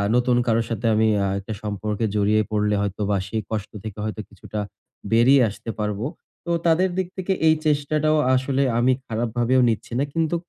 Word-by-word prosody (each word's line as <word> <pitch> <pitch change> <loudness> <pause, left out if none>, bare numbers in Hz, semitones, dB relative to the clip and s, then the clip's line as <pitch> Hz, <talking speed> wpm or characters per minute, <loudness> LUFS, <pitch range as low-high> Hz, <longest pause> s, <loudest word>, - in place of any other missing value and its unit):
নতুন 125 0 +3
কারো 115 0 +3
সাথে 115 0 -3
আমি 110 0 +3 0.2
আ - - +1
একটা 100 +3 -6
সম্পর্কে 105 +1 -2
জড়িয়ে 105 +1 +3
পড়লে 105 -1 +1
হয়তো 100 0 -3
বা 100 - +2
সেই 110 +2 -2
কষ্ট 105 -2 -3
থেকে 110 -2 -7
হয়তো 110 0 -4
কিছুটা 105 - -7 0.5
বেরিয়ে 130 +4 +5
আসতে 105 - -9
পারবো। 105 +1 -2 0.4
তো 170 - -2
তাদের 170 +3 +3
দিক 185 -2 0
থেকে 190 +1 0
এই 160 - +6
চেষ্টাটাও 155 +1 +2 0.2
আসলে 135 +1 +1 0.2
আমি 130 +2 +4
খারাপ 115 +1 -2
ভাবেও 125 +2 +3
নিচ্ছি 115 +1 -3
না। - - +2
কিন্তু 165 +1 +1
115 Hz, 185 wpm, -23 LUFS, 105-140 Hz, 0.5 s, এই